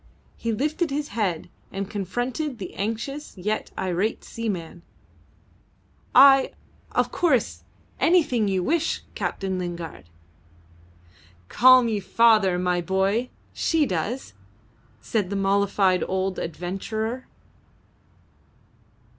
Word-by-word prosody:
He 230 - -3
lifted 305 +8 -1
his 290 +1 -3
head 190 -8 -2 0.2
and 195 0 -4
confronted 245 - -3
the 190 -4 -7
anxious 230 +7 -4
yet 210 +4 -2
irate 190 +4 -1
seaman. 180 -7 -5 1.3
"I 270 0 +7 0.4
of - - +1
course 265 - +1 0.4
anything 300 - +3
you 190 -2 0
wish, 325 - 0
Captain 190 -1 -3
Lingard." 170 - -6 1.4
"Call 255 0 +7
me 225 -3 0
father, 210 -2 +4
my 180 0 0
boy. 195 +7 0 0.2
She 320 -2 +1
does," 200 - -3 0.7
said 205 - -1
the 200 - -3
mollified 195 -1 +2
old 190 0 -1
adventurer. 215 +8 -4
210 Hz, 95 wpm, -24 LUFS, 185-255 Hz, 1.4 s, I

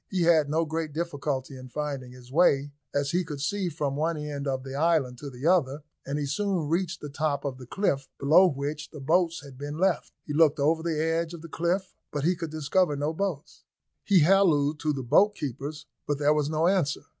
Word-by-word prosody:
He 185 -3 0
had 160 -4 +4
no 160 +2 +1
great 160 -1 -3
difficulty 145 -4 -3
in 130 0 -10
finding 140 -3 -4
his 125 0 -14
way, 145 -3 +3 0.2
as 140 0 0
he 180 +1 +1
could 150 -4 -6
see 185 +6 -1
from 145 -4 -2
one 160 +2 0
end 145 -1 -4
of 130 -1 -1
the 135 0 -7
island 145 -5 +1
to 145 - -6
the 130 +2 -8
other, 155 -5 +2 0.2
and 140 +1 -2
he 145 - -1
soon 175 +2 -1
reached 175 +2 -1
the 150 - -6
top 145 0 -1
of 130 -2 -3
the 125 - -10
cliff, 140 -6 -1
below 160 +7 +6
which 145 0 -3
the 150 - -10
boats 165 +2 +1
had 135 -2 -12
been 145 +1 -5
left; 185 0 +1
he 150 - -4
looked 155 -1 +4
over 160 +3 +2
the 160 -2 -1
edge 165 +1 0
of 165 - -11
the - - -7
cliff, 175 +4 -1 0.2
but 145 -2 -3
he 175 +4 +3
could 165 -2 -5
discover 155 +2 +1
no 145 +3 -1
boats. 175 -5 -4 0.4
He 195 -4 +4
hallooed 155 -4 +4
to 155 - 0
the 135 -3 -3
boat 205 - +4
keepers, 145 - -5 0.2
but 145 - 0
there 145 +1 +3
was 150 -1 0
no 155 +1 +1
answer. 175 -6 +1
150 Hz, 220 wpm, -27 LUFS, 140-170 Hz, 0.4 s, below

